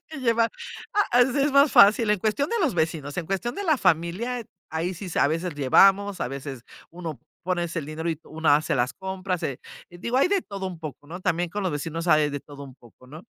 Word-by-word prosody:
que 315 -2 -8
llevar 230 -2 +2 0.4
ah, 415 0 +4
así 245 +2 +4
es 280 +1 +2
más 280 +1 +6
fácil, 215 +2 +6
en 210 -2 +3
cuestión 225 - 0
de 470 - -1
los 300 - +2
vecinos, 160 -3 -2
en 165 - -3
cuestión 195 +5 -2
de 405 - -4
la 315 -6 +2
familia, 185 +7 0 0.3
ahí 165 +4 -2
sí 185 +4 -8
s 180 - -4
a - - +5
veces 165 +2 -2
llevamos, 195 +8 +4
a - - -2
veces 135 -2 -7 0.3
uno 165 -4 -7 0.2
pones 175 -1 -2
el 155 - -3
dinero 160 +2 -3
y 160 - -3
una 155 -2 +2
hace 155 - -1
las 125 0 0
compras, 190 -1 -4
eh, 135 - -4 0.3
digo 180 +8 -4
hay 270 - +5
de 390 -1 +1
todo 195 -2 -6
un 180 -3 -7
poco, 150 -2 -8
¿no?, 175 +4 -8
también 175 -1 0
con 205 +3 -4
los 185 - 0
vecinos 165 +4 -4
hay 155 -2 +4
de 145 -1 -5
todo 140 -1 -11
un 135 -2 -12
poco, 125 0 -20
¿no?, 155 +5 -11
175 Hz, 235 wpm, -25 LUFS, 155-210 Hz, 0.4 s, más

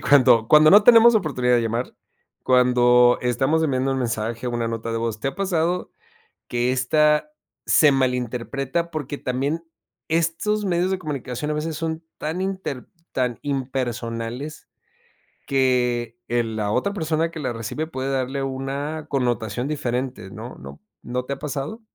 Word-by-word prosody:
cuando 120 -5 +5
cuando 155 0 +7
no 205 +2 +8
tenemos 235 +1 +8
oportunidad 130 - +2
de 120 - +1
llamar, 115 +2 -2 0.5
cuando 125 -1 +5
estamos 135 +6 +1
enviando 135 -2 +1
un 135 - -1
mensaje, 115 0 -2
una 120 -1 -2
nota 115 0 -4
de 115 - -2
voz, 115 -2 -3
¿te 135 - -1
ha 135 - -5
pasado 180 -2 -1 0.6
que 120 +1 0
esta 150 - +2 0.3
se 150 -2 +5
malinterpreta?, 130 +5 -1
porque 145 -2 -4
también, 140 +6 -2 0.4
estos 170 +6 0
medios 180 0 +1
de 190 - -1
comunicación 150 -3 -4
a 150 - 0
veces 155 0 -3
son, 160 0 -4
tan 160 +4 -3
inter 190 -9 -4 0.3
tan 125 -2 -1
impersonales 125 0 -4 0.8
que 125 -3 +1
el 115 -2 -1
la 105 -1 -1
otra 130 - 0
persona 160 -2 -1
que 160 - -7
la 130 -3 -2
recibe 125 +8 -4
puede 135 -3 -4
darle 135 +1 -1
una 140 +3 -4
connotación 120 -2 -1
diferente, 125 -7 -3
¿no?, - - -9
¿no?, 70 +2 -11 0.2
¿no 125 +1 -3
te 140 - -5
ha - - -14
pasado? 150 - -4
135 Hz, 150 wpm, -23 LUFS, 120-155 Hz, 0.8 s, no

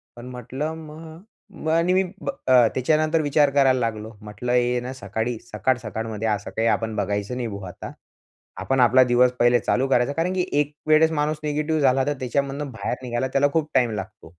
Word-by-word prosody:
पण 120 - -10
म्हटलं 130 +5 -5
मग 160 +4 -10
आणि 170 +3 +2
मी 190 +1 +3 0.2
ब - - -4 0.2
अ, 125 -3 +6
त्याच्यानंतर 155 +4 +2
विचार 145 0 +3
करायला 135 -2 +3
लागलो. 110 -2 -3
म्हटलं 105 +4 -5
हे 125 0 +2
ना 130 +2 -6
सकाळी 110 0 -3
सकाळ-सकाळमध्ये 110 -2 -2
असं 105 -2 -2
काही 115 +1 +1
आपण 110 -1 0
बघायचं 100 +2 -2
नाही 120 - -2
भो 100 -2 -7
आता. 90 - -9 0.7
आपण 135 0 0
आपला 125 +1 +6
दिवस 125 0 +3
पहिले 120 0 +4
चालू 130 +2 0
करायचा 130 +1 +2
कारण, 165 +4 -1
की 185 -1 0
एक 150 0 -1
वेळेस 155 +1 +5
माणूस 150 0 -1
निगेटिव्ह 150 +1 -1
झाला, 135 0 +3
तर 145 - 0
त्याच्यामधून 140 +3 -2
बाहेर 125 - -3
निघायला 120 +1 -2
त्याला 140 +1 +4
खूप 155 -2 0
टाईम 125 -3 +3
लागतो. 105 -1 -7
130 Hz, 185 wpm, -23 LUFS, 115-150 Hz, 0.7 s, अ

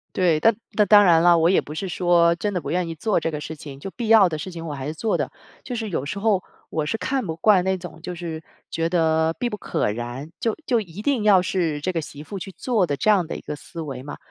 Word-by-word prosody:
对， 175 -4 +3
但 225 +7 +4 0.2
那 210 - +3
当 205 0 +7
然 165 -3 +6
了， 175 0 +6
我 165 +1 +4
也 190 - +4
不 150 - -9
是 190 +4 -3
说 175 -1 +3
真 205 +4 -2
的 180 - -1
不 - - -5
愿 175 0 0
意 165 - -5
做 200 +6 +1
这 165 - -2
个 150 -2 -4
事 160 +1 -6
情。 145 -2 -10
就 195 - -7
必 235 +2 -5
要 220 -3 +7
的 155 - -3
事 185 - -6
情， 165 -1 -7
我 150 - -4
还 135 0 -5
是 155 - -3
做 215 +7 -1
的。 - - -2 0.3
就 250 - -5
是 220 -2 -3
有 150 -7 -2
时 155 - -4
候 200 -2 +1 0.3
我 155 -2 -2
是 190 - -1
看 260 +1 -1
不 160 - -3
惯 190 +1 +4
那 190 0 0
种， 170 -2 -10
就 180 +1 -6
是 165 -2 -6 0.3
觉 165 0 -1
得 160 -2 +2
必 245 - 0
不 210 - -5
可 105 - -1
然， 120 +7 -6
就 225 -2 0
就 240 -4 +2
一 185 0 -9
定 250 -3 +1
要 200 -3 +6
是 170 -5 -1
这 185 - -1
个 165 -2 -2
媳 150 0 -9
妇 195 +5 -7
去 195 - -7
做 210 -3 0
的 145 - -1
这 135 - +1
样 185 -5 +2
的 - - -5
一 - - -7
个 - - -5
思 165 +3 -11
维 135 -5 -6
嘛， 145 +2 -8
175 Hz, 305 characters per minute, -23 LUFS, 160-200 Hz, 0.3 s, 当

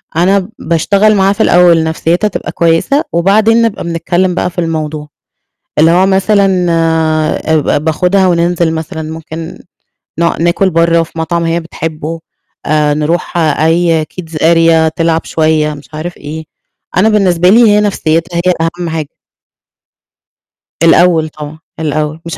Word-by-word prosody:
أنا 190 +3 +1
باشتغل 200 +6 +1
معاها 195 0 +2
في - - 0
الأول 175 -2 +4
نَفْسيتها 165 +5 0
تبقى - - -5
كويسة 170 - +1
وبعدين 215 +6 +3
نبقى 230 -3 -1
بنتكلّم 175 +2 -1
بقى 180 - -1
في 175 - -7
الموضوع، 155 -2 -4 0.7
اللي 160 +2 +5
هو 180 +2 +3
مثلًا 195 -1 +2
آآ 160 -1 0
ب 150 - -2
ب 145 - 0
باخُدها 180 +4 +1
وننزِل 170 -1 +1
مثلًا 160 +1 -5
ممكن 160 +1 -8 0.6
ن 170 -1 0
ناكُل 175 +3 +1
برّه 165 0 +2
في 165 0 -10
مطعم 170 +1 -1
هي 165 +1 0
بتحبه، 165 -1 -6 0.5
آآ 150 -1 +1
نروح 155 +4 -2
أي 165 +1 +1
kids 165 -1 -10
area 165 0 +3
تلعب 165 -1 0
شوية 155 -1 0
مش 145 0 -13
عارف 165 +3 -6
إيه، 155 +2 -8 0.5
أنا 210 +4 +4
بالنسبة 180 -4 +2
لي 220 +5 +5
هي 210 0 +3
نَفْسيتها 170 -4 -1
هي 180 - +3 0.3
أهَم 175 -1 -3
حاجة. 160 -3 -4 1.7
الأول 165 -1 +3
طبعًا، 155 0 -10 0.2
الأول 155 0 -2
مش 170 - -6
165 Hz, 140 wpm, -12 LUFS, 160-180 Hz, 1.7 s, اللي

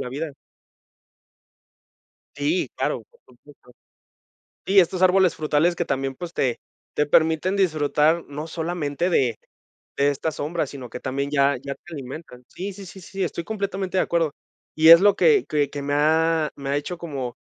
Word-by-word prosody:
la - - -5
vida. 150 +3 -4 2.0
Sí, 340 +4 0
claro, - - -1
por 475 - -27
supuesto. - - -20 0.9
Sí, 195 +1 +3
estos 185 0 +3
árboles 185 -1 +4
frutales 155 +3 +1
que 175 - -1
también, 135 -2 -2
pues, 170 +4 -7
te 125 -7 0 0.4
te 150 - +2
permiten 160 +5 +2
disfrutar 155 -2 +2
no 145 +2 -6
solamente 165 0 -2
de 125 -9 +2 0.6
de 140 +1 +3
esta 145 +3 -2
sombra, 155 +3 -3
sino 130 -4 -9
que 125 - -7
también 140 +2 -3
ya 140 -1 +3
ya 140 +2 -6
te 175 +5 -14
alimentan. 135 -2 -9
Sí, 195 +7 -6
sí, 195 +1 -10
sí, 190 +2 -11
sí, 190 +1 -5
estoy 170 -1 -3
completamente 195 -2 -3
de - - +4
acuerdo. 165 -4 0 0.4
Y 160 +1 +5
es 165 0 +11
lo 205 +2 +4
que 435 -5 +4
que 145 -2 0
que 145 - -6
me 145 0 -2
ha 160 +1 +2
me 140 -1 -6
ha 140 - +1
hecho 145 +5 -3
como 140 -8 -5
160 Hz, 170 wpm, -23 LUFS, 140-180 Hz, 2.0 s, es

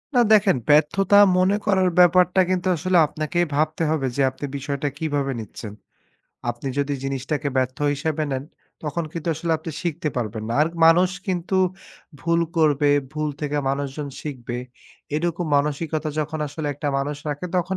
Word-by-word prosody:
না 245 - +6
দেখেন, 200 -6 +5
ব্যর্থতা 170 +7 +4 0.2
মনে 185 +2 +3
করার 190 -3 +3
ব্যাপারটা 180 +1 +5
কিন্তু 185 0 0
আসলে 185 +3 +1
আপনাকেই 155 +4 -1
ভাবতে 155 +2 0
হবে 145 -4 0
যে 140 - +1
আপনি 130 - -6
বিষয়টা 140 +1 -3
কিভাবে 145 -3 -1
নিচ্ছেন। 110 0 -8 0.8
আপনি 120 +3 -8
যদি 140 0 0
জিনিসটাকে 140 +2 -2
ব্যর্থ 130 0 0 0.2
হিসেবে 155 +1 -2
নেন 135 0 -2 0.4
তখন 160 +2 -2
কিন্তু 165 0 -4
আসলে 165 +2 -2
আপনি 160 - -6
শিখতে 170 -2 -2
পারবেন 110 -2 -3
না। 115 - -2
আর - - +2 0.2
মানুষ 175 +3 +6 0.2
কিন্তু 185 0 -1 0.6
ভুল 170 0 +1 0.2
করবে। 145 -2 +3 0.2
ভুল 155 0 -2
থেকে 150 0 -2
মানুষজন 140 +1 -3
শিখবে। 125 -5 -5 0.6
এরকম 170 +2 -1
মানসিকতা 150 +2 -1
যখন 155 +1 -3
আসলে 150 +2 -5
একটা 145 0 -3
মানুষ 145 +2 -2
রাখে 150 +5 -3
তখন 185 +2 0
155 Hz, 155 wpm, -23 LUFS, 140-175 Hz, 0.8 s, না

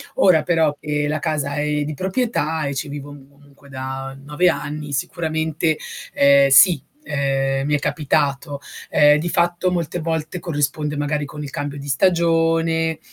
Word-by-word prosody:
Ora 160 -5 +4
però 160 -3 +2
che 150 -1 -1
la 155 0 -1
casa 145 -3 -2
è 150 0 0
di 150 +1 -4
proprietà 185 - -1
e 140 0 -3
ci 140 - -3
vivo 145 0 -7 0.2
comunque 140 0 -21
da 135 0 -6
9 155 +5 +2
anni, 150 -2 -4
sicuramente, 160 +2 -1 0.4
ehm, 140 0 +5
sì, 155 +2 +7 0.2
uhm, 135 -1 0
mi 150 0 +1
è - - 0
capitato. 145 -1 -1 0.3
Uhm, 150 0 +6
di 170 +3 -2
fatto 175 +2 +1
molte 175 -1 -2
volte 160 +1 -3
corrisponde 150 -2 -2
magari 145 0 -1
con 150 +1 -8
il 145 - -6
cambio 145 +1 -5
di 140 - -9
stagione, 165 0 +2
150 Hz, 155 wpm, -21 LUFS, 140-165 Hz, 0.4 s, sì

